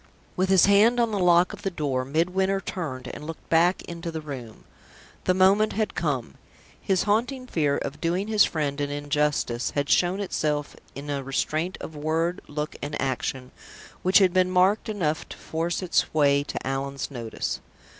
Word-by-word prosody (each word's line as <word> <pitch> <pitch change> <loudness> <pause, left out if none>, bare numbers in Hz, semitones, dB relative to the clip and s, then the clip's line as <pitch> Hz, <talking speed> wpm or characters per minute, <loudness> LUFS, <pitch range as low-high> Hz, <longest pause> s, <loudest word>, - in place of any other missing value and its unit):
With 185 +1 0
his 190 -2 +6
hand 210 +5 +5
on 235 -2 +2
the 205 - -1
lock 175 0 +4
of - - -9
the 200 - -1
door, 140 -7 -1
Midwinter 180 +7 +1
turned, 145 -9 -5
and 150 - -8
looked 165 - -8
back 175 +3 +3
into 170 0 -6
the 160 -1 -4
room. 130 -7 -8 0.6
The 185 - +3
moment 195 +3 +4
had 215 0 -1
come. 130 - -2 0.4
His 190 -2 +1
haunting 245 +5 0
fear 150 - +1
of 145 +2 -5
doing 180 +4 0
his 215 -2 +5
friend 145 -3 -1
an 145 - -1
injustice 145 -4 0
had 145 0 -1
shown 180 +2 +3
itself 150 -7 -2 0.2
in 145 +1 -6
a 140 -1 -2
restraint 155 +6 -2
of 160 - -7
word, 160 +4 -1
look, 150 +1 -4
and 145 +1 -4
action 130 -1 -2 0.5
which 185 +1 +5
had 190 -3 +4
been 185 -1 +3
marked 185 +4 +3
enough 165 -8 -1
to - - -9
force 170 +3 -3
its 180 - +1
way 140 -2 +4
to - - -5
Allan's 135 +1 -3
notice. 115 -4 -4
165 Hz, 175 wpm, -25 LUFS, 145-190 Hz, 0.6 s, his